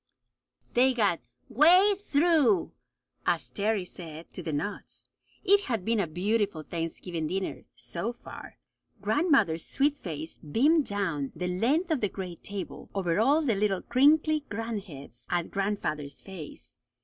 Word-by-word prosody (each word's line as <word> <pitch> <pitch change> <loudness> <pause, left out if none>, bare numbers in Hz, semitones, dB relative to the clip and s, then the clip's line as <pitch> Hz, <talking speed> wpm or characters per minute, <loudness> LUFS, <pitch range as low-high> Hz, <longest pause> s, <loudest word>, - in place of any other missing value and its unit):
They 250 +2 +5
had - - -12
got 200 -7 +2 0.3
"way 350 - +6
through," 345 0 +2 0.6
as 160 -9 0
Terry 200 +5 0
said, 165 -2 -10
to - - -7
the 160 -2 -4
nuts. 195 +8 -5 0.4
It 405 0 +4
had 225 -7 -2
been 230 -1 +1
a 190 - +1
beautiful 195 0 -1
Thanksgiving 165 0 -4
dinner 190 +3 -3
"so 190 +7 -4
far." 245 - -11 0.4
Grandmother's 215 - +2
sweet 280 +2 +1
face 160 - -7
beamed 280 - +2
down 170 -9 -2
the 180 - -3
length 265 - +1
of 305 - +1
the 205 - +1
great 180 -3 -7
table, 200 -2 -6
over 180 -2 0
all 285 +8 +4
the 250 -6 +2
little 195 -2 0
crinkly 300 +4 +4
grandheads, 200 - -6
at 175 -1 -1
grandfather's 160 -8 -2
face. 185 -6 -11
200 Hz, 140 wpm, -28 LUFS, 170-270 Hz, 0.6 s, way